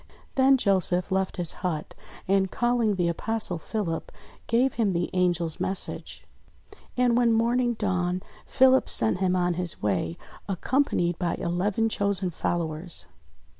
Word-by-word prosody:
Then 270 0 +5
Joseph 190 -4 +1
left 190 0 -1
his 175 -3 0
hut 165 -5 -3 0.3
and 190 0 +2
calling 240 -2 +1
the 175 -2 0
Apostle 185 +1 -1
Philip, 170 -3 -4 0.4
gave 245 +3 +2
him 210 -5 0
the 175 0 -2
Angel's 175 -3 +1
message. 190 0 -1 0.7
And, 245 -1 +3
when 240 -1 +3
morning 240 +2 +2
dawned, 185 -3 -1 0.2
Philip 265 0 +4
sent 110 +10 +1
him 185 -1 +1
on 180 -1 +1
his 170 -6 -2
way, 90 -5 -1 0.3
accompanied 190 - 0
by 175 -2 -1
eleven 190 +5 0
chosen 200 -4 0
followers. 165 0 -2
185 Hz, 130 wpm, -26 LUFS, 175-225 Hz, 0.7 s, Then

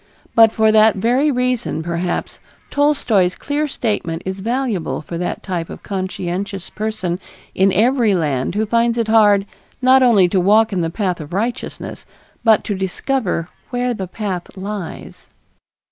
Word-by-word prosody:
But 225 -1 +7
for 220 -1 +3
that 220 0 +5
very 245 +9 +2
reason 250 - -1
perhaps, 170 +1 -3 0.3
Tolstoy's 250 -11 +2
clear 295 +1 -2
statement 185 - -2
is 190 +1 -4
valuable 230 -7 -2
for 170 - -7
that 175 - -3
type 175 -4 -3
of - - -9
conscientious 190 0 -4
person 210 -5 -3 0.3
in 190 +1 +3
every 230 +1 +3
land 150 -2 -1
who 215 +1 +1
finds 235 +2 +1
it 230 -2 0
hard, 205 -3 +5 0.3
not 260 +1 +5
only 220 -8 +5
to 190 - +2
walk 215 +4 +4
in 180 - 0
the 165 - -1
path 180 -2 -2
of 150 +2 -9
righteousness, 235 +6 -4 0.4
but 220 -3 +4
to 205 - -2
discover 190 - -2 0.2
where 245 0 -1
the 190 -4 -5
path 190 -2 -5
lies. 195 -2 -7
205 Hz, 150 wpm, -19 LUFS, 180-235 Hz, 0.4 s, But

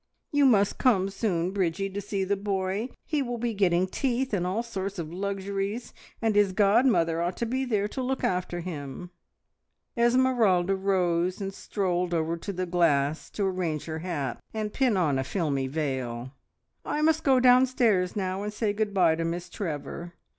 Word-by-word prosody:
You 290 -1 +4
must 205 -5 +3
come 195 -7 +3
soon, 185 -4 -1
Bridgie, 195 0 0
to 200 +1 -4
see 200 -1 -2
the 200 +2 +1
boy. 195 +3 -2 0.2
He 300 -3 0
will 245 -2 -3
be 235 0 -2
getting 185 -3 +2
teeth 255 +4 -1
and 180 -3 0
all 205 +6 -1
sorts 200 -4 -4
of 165 -1 -5
luxuries, 200 +3 -3 0.3
and 220 -2 +2
his 205 -2 +4
godmother 195 -5 +3
ought 175 +1 -2
to 235 - -1
be 260 +3 -1
there 210 -5 0
to 260 - -4
look 260 +1 -2
after 180 -1 -1
him." 165 0 -7 0.8
Esmeralda 235 -7 +3
rose 185 -2 +1
and 195 -1 -4
strolled 180 -3 -1
over 165 0 0
to 170 +4 -5
the 185 -1 -2
glass 160 -4 +1
to 205 - -2
arrange 180 -5 -2
her 160 -1 -4
hat 150 -8 -3 0.2
and 215 -1 -3
pin 255 -7 +2
on 150 -7 +2
a - - 0
filmy 140 -4 -1
veil. 130 -4 -3 0.5
"I 300 - -1
must 320 0 +3
go 265 -2 +4
downstairs 245 -7 +4
now, 190 -1 -2
and 210 +1 -3
say 210 -1 -1
good 210 -1 -2
bye 175 -4 +5
to 165 +1 -2
Miss 170 +1 -3
Trevor. 170 -1 -5
195 Hz, 175 wpm, -27 LUFS, 170-220 Hz, 0.8 s, bye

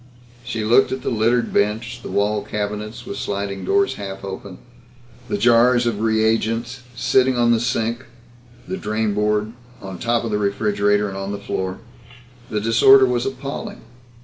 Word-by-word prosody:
She 115 -2 -4
looked 120 +4 +4
at 130 -1 -4
the - - -1
littered 115 +2 +1
bench, 115 +4 0
the - - -8
wall 105 +1 0
cabinets 105 +1 -5
with 200 +1 -6
sliding 100 -1 -3
doors 200 - +1
half 95 -1 -6
open, 95 -1 -7 0.7
the - - -1
jars 120 +2 +4
of 115 -3 -1
reagents 115 +2 0
sitting 130 +1 +2
on 120 0 +3
the 115 - +3
sink, 115 +1 -1 0.6
the 190 - -3
drainboard, 105 - -1 0.3
on 95 -2 -8
top 120 0 0
of 115 - -3
the 105 - 0
refrigerator 105 0 +1
and 95 -1 -6
on 95 +1 -4
the 100 - -3
floor. 95 -2 -4 0.7
The 105 - -1
disorder 115 +5 +6
was 125 0 0
appalling. 135 +1 -6
110 Hz, 155 wpm, -21 LUFS, 105-120 Hz, 0.7 s, disorder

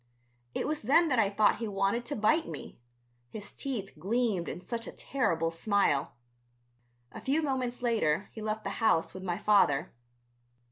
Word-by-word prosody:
It - - -1
was 305 0 -1
then 310 +8 +4
that 255 -4 +2
I 205 - +4
thought 205 +1 +3
he 230 - -3
wanted 200 +4 0
to 290 - -3
bite 310 +10 +2
me, - - -8 0.5
his 205 - -9
teeth 235 -8 -4
gleamed 205 -1 0
in - - -5
such 230 +5 -5
a - - -5
terrible 165 -12 -1
smile. 165 - +1 1.0
A - - -9
few 290 +4 +1
moments 255 -3 -2
later 205 -7 +1
he 220 - -8
left 215 0 -3
the 195 - -3
house 165 -7 +3
with 185 - -8
my 175 -2 -2
father. 185 -7 +3
215 Hz, 170 wpm, -30 LUFS, 190-245 Hz, 1.0 s, then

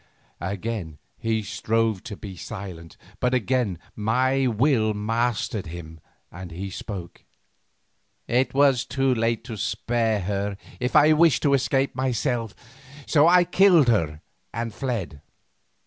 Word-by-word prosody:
Again 95 -3 -4 0.2
he 110 -1 -1
strove 110 -1 0
to 105 - -7
be 95 -2 -8
silent, 90 -3 -8 0.2
but 125 0 +1
again 125 -5 0 0.2
my 130 +5 +1
will 115 -2 +2
mastered 110 -2 -1
him 80 -1 -9 0.3
and 90 +1 -8
he 95 +4 -6
spoke. 90 -2 -7 1.0
"It 125 +2 +2
was 140 -3 +4
too 135 -1 +1
late 115 -1 0
to 115 -4 -7
spare 110 0 0
her 100 +1 -2 0.2
if 125 0 -2
I 155 +1 +7
wished 155 -5 +4
to 140 - +3
escape 135 0 +1
myself, 120 -3 -1 0.5
so 155 0 +4
I 180 +1 +6
killed 175 -5 +5
her 80 -9 +1 0.3
and 115 -1 -4
fled. 105 - -4
115 Hz, 130 wpm, -24 LUFS, 100-130 Hz, 1.0 s, I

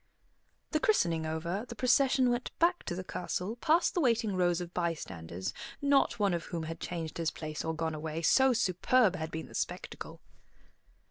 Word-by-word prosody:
The 310 - +2
christening 170 - +2
over, 170 +6 -2
the 235 - -8
procession 255 +1 +3
went 240 +1 -1
back 350 +1 +2
to 175 - -3
the 185 - -4
castle, 185 +4 -3
past 330 +6 +3
the 350 - +1
waiting 230 -6 +2
rows 175 -1 +2
of 175 0 -6
bystanders, 95 - -3 0.3
not 280 -1 +3
one 200 -4 +2
of 170 -1 -2
whom 170 -2 -4
had 165 +1 -5
changed 165 -2 -5
his 165 -1 +1
place 155 -1 -5
or 160 0 -2
gone 160 0 -2
away, 155 +1 -4
so 265 +10 +5
superb 220 -1 +3
had 160 -2 -4
been 160 0 -5
the - - -14
spectacle. - - -5
180 Hz, 180 wpm, -31 LUFS, 160-245 Hz, 0.3 s, so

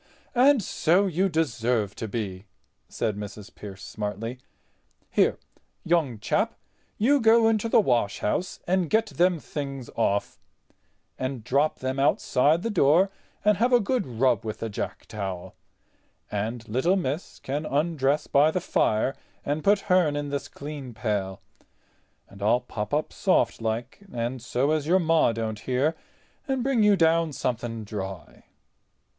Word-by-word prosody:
"And 260 -1 +5
so 180 +5 +2
you 190 +1 +1
deserve 120 - 0
to 110 - -4
be," 100 -3 -4 0.4
said 110 -3 -2
Mrs. 105 +1 -8
Pearce, 95 -2 -10
smartly. 110 +5 -5 0.7
"Here, - - +3 0.5
young 160 -9 +1
chap, 105 - 0 0.4
you 270 +6 +3
go 225 0 +5
into 225 0 +1
the - - +5
washhouse 120 - 0
and 180 -2 +1
get 220 +1 +3
them 180 -2 +2
things 140 -5 -6
off, 100 -3 0 0.8
and 130 -3 -3
drop 140 +6 +1
them 130 +1 -2
outside 145 +3 +2
the 230 - -1
door, 180 +2 +4 0.3
and 210 -2 +4
have 240 +4 +2
a 245 - +6
good 240 - -1
rub 120 -2 +1
with 110 -1 -4
the 115 - -2
jack 100 - -5
towel; 95 -4 -5 0.8
and 110 +3 -3
little 130 - +2
miss 160 -2 -3
can 145 +3 -3
undress 145 -1 +1
by 145 +2 +4
the 185 - 0
fire 130 -6 +1 0.3
and 145 +2 -1
put 200 0 +4
hern 180 -7 +2
in 145 0 -3
this 140 0 -3
clean 140 -5 -8
pail—and 100 -1 -7
I'll 110 +4 +3
pop 105 -3 -5
up 150 +1 0
softlike 115 - 0
and 120 +1 -3
so 125 +4 0
as 155 -1 0
your 180 +3 +5
Ma 165 -7 +3
don't 110 -1 -3
hear, 130 +7 0 0.5
and 265 -3 0
bring 265 -3 +2
you 210 -1 +5
down 165 -2 +3
something 120 -3 -3
dry." 95 -6 -7
140 Hz, 145 wpm, -26 LUFS, 115-175 Hz, 0.8 s, a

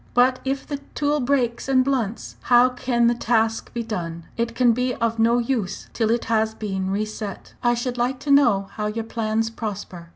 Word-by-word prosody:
But 255 +1 +4
if 270 +1 -2
the 285 - -4 0.2
tool 295 0 +1
breaks 250 -2 0
and 260 -1 +4
blunts, 240 -6 -2
how 245 +1 +5
can 245 -1 0
the 235 - +4
task 225 -1 0
be 235 0 -3
done? 170 -7 -4
It 230 0 -2
can 245 -1 +4
be 250 +1 -1
of 230 -1 -1
no 230 +2 +4
use 235 -5 -2
till 225 -2 0
it 235 +1 +1
has 220 -1 +1
been 190 -3 -3
re 205 +2 0
set. 215 -2 -7
"I 240 0 +3
should 245 +1 -3
like 250 +2 0
to 290 - -1
know 235 -9 +4
how 210 -1 -1
your 225 +2 -3
plans 225 -1 -1
prosper. 200 -6 -6
235 Hz, 200 wpm, -23 LUFS, 215-250 Hz, 0.2 s, how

